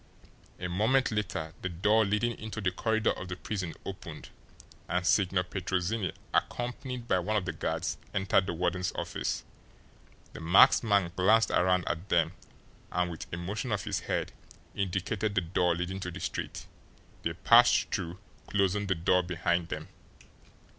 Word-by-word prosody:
A 90 - -3
moment 110 +10 +2
later 90 -7 -2
the 95 - -2
door 105 +6 +3
leading 105 +3 0
into 110 0 -5
the 95 -3 +1
corridor 110 +3 +1
of 90 - -6
the 90 - -4
prison 90 -2 -4
opened, 85 -5 -8 0.6
and 90 +1 0
Signor 95 -1 +3
Petrozinni, 95 +1 -1 0.2
accompanied 125 0 -2
by 95 - +3
one 105 +5 0
of 95 - -1
the 90 - -1
guards, - - -2
entered 95 -1 +2
the - - -1
warden's 90 +1 0
office. - - -2 0.9
The - - -8
masked 85 +8 +6
man 100 -6 +2
glanced 110 +5 +4
around 90 0 +2
at 85 +3 -3
them, 85 -2 +3 0.6
and 90 0 0
with 80 - -8
a 85 - -3
motion 105 +8 -3
of 105 -2 0
his - - -1
head - - -2 0.4
indicated 100 +2 -1
the 95 - +3
door 85 0 +1
leading 90 +2 -3
to 90 - -4
the 90 +2 -7
street. - - -4 0.6
They 85 - -1
passed 115 +8 +5
through, 90 -3 -3 0.3
closing 100 0 +1
the 95 - +1
door 90 +2 +3
behind 85 -1 0
them. - - -5
95 Hz, 160 wpm, -30 LUFS, 90-105 Hz, 0.9 s, masked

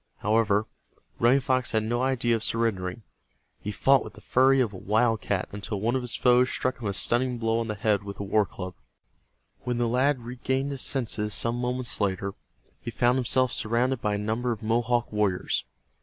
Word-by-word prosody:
However, 105 0 +2 0.5
Running 125 +4 +4
Fox 130 -1 0
had 110 -1 +2
no 120 +3 -1
idea 125 -3 +1
of 110 - -3
surrendering. 110 -3 -1 0.6
He 105 - -4
fought 135 +5 +3
with - - -10
the - - -14
fury 135 +1 +4
of 115 -5 +1
a - - -7
wildcat 110 -1 0
until 100 0 -5
one 115 +5 0
of 130 - 0
his 125 -1 -1
foes 125 0 +4
struck 130 0 -2
him 115 - -4
a 100 - -1
stunning 125 +4 +1
blow 115 0 0
on 115 - -2
the 105 - -3
head 105 -1 +1
with 100 0 -8
a - - -2
war 100 0 +2
club. 90 -1 -7 0.9
When 125 -1 -3
the 120 -1 +1
lad 130 +4 +2
regained 130 +3 -2
his 135 -2 -4
senses 110 -5 -1
some 115 0 0
moments 125 -1 -2
later 100 0 -1 0.5
he - - -5
found 120 +2 +2
himself 130 +1 +2
surrounded 120 +2 0
by 105 -1 0
a - - -1
number 110 +4 -1
of 110 -1 -5
Mohawk 120 +1 0
warriors. 105 -4 0
115 Hz, 195 wpm, -26 LUFS, 105-125 Hz, 0.9 s, Running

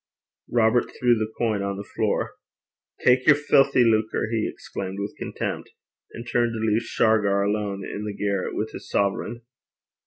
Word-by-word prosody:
Robert 120 0 +3
threw 120 -1 +4
the 110 -1 -2
coin 110 -4 0
on 100 0 -3
the 100 - -5
floor. - - 0 0.7
'Tak 125 +1 +4
yer 155 - +8
filthy 140 -3 +4
lucre!' 110 -1 +1
he 110 -2 0
exclaimed 95 0 -6
with 100 +1 -4
contempt, - - -4 0.4
and 115 +1 -9
turned 120 0 +1
to 110 - -4
leave 110 0 +1
Shargar 105 -4 +2
alone 100 -1 -2
in 105 - -5
the 105 -1 -5
garret 100 -2 -1
with 110 +1 -2
his - - -10
sovereign. 105 +4 -1
110 Hz, 160 wpm, -24 LUFS, 100-120 Hz, 0.7 s, yer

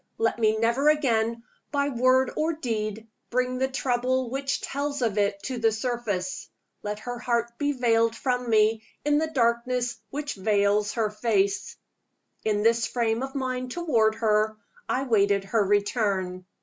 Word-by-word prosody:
let 230 +1 0
me 220 -1 +3
never 235 +6 +3
again, 230 -6 +1 0.3
by 285 -1 +1
word 255 0 +3
or 320 +2 0
deed, 220 -6 -3 0.2
bring 255 +1 0
the 265 - +2
trouble 255 -1 0
which 275 +1 -1
tells 285 -1 -3
of 220 -4 0
it 200 -1 +1
to 255 +1 -3
the 225 -1 +3
surface! 220 -5 -3 0.3
let 210 0 -4
her 245 +2 -6
heart 235 -1 -1
be 290 0 +1
veiled 230 -3 +2
from 250 -1 -1
me 220 0 +3 0.2
in 295 0 +3
the 320 - 0
darkness 245 -2 0
which 290 +1 -4
veils 205 +1 +1
her 220 -3 0
face! 210 -2 0 0.7
In 210 -1 +1
this 230 0 +3
frame 230 -1 0
of 270 +1 -5
mind 255 -1 -2
toward 240 -9 +1
her, 215 -1 +1 0.3
I 260 - +1
waited 200 -5 +2
her 210 +2 +1
return. 195 -3 0
235 Hz, 155 wpm, -26 LUFS, 215-255 Hz, 0.7 s, me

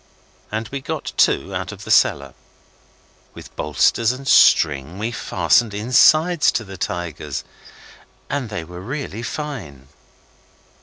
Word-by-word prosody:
And 110 +1 -3
we 140 0 -5
got - - -5
two 95 +8 +2
out 90 +2 -4
of 105 0 -11
the 110 - -5
cellar. 70 - +3 1.0
With - - -13
bolsters 75 - +1
and 130 +2 -8
string 75 +3 +4
we 110 +3 -3
fastened 105 +1 +1
insides 155 +9 +4
to 110 - -1
the 95 -2 -10
tigers 85 -6 -5 0.8
and 140 -5 -3
they 105 -5 -5
were 90 +2 -10
really 120 -1 -5
fine. 110 - -7
105 Hz, 125 wpm, -20 LUFS, 85-125 Hz, 1.0 s, string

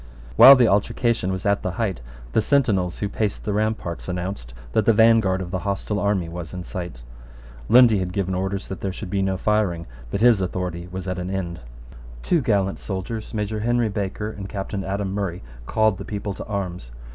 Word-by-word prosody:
While 130 +4 +11
the 125 -3 +4
altercation 105 0 +1
was 95 0 -4
at 100 0 +2
the 90 - -3
height, 95 - -2 0.3
the - - +3
sentinels 105 -9 +1
who 100 - -2
paced 105 0 -2
the 105 - -1
ramparts 105 -5 -2
announced 90 -8 -4 0.2
that 110 - +1
the 115 - +6
vanguard 110 -4 +4
of 90 - -8
the 95 - -1
hostile 100 +2 -2
army 100 -4 0
was 85 0 -7
in 90 - -5
sight. 85 -9 -7 0.7
Lundy 120 -4 +7
had 90 -1 -2
given 95 -1 -1
orders 95 +1 -2
that 95 - -6
there 95 - -2
should 95 0 -7
be 100 - +1
no 95 -1 0
firing; 95 -5 0 0.2
but 100 - -2
his 115 -4 +5
authority 90 -1 -3
was 95 0 -6
at 90 -1 -2
an 90 +1 -4
end. 90 -3 -3 0.6
Two 170 - +2
gallant 100 -5 0
soldiers, 105 +3 -5
Major 105 0 -2
Henry 120 +1 +1
Baker 105 +1 -3
and 100 -2 -8
Captain 100 -1 -4
Adam 95 0 -2
Murray, 95 -3 -3 0.2
called 110 -3 +2
the - - -5
people 100 0 -4
to - - -8
arms. 90 - -4
100 Hz, 195 wpm, -23 LUFS, 90-110 Hz, 0.7 s, While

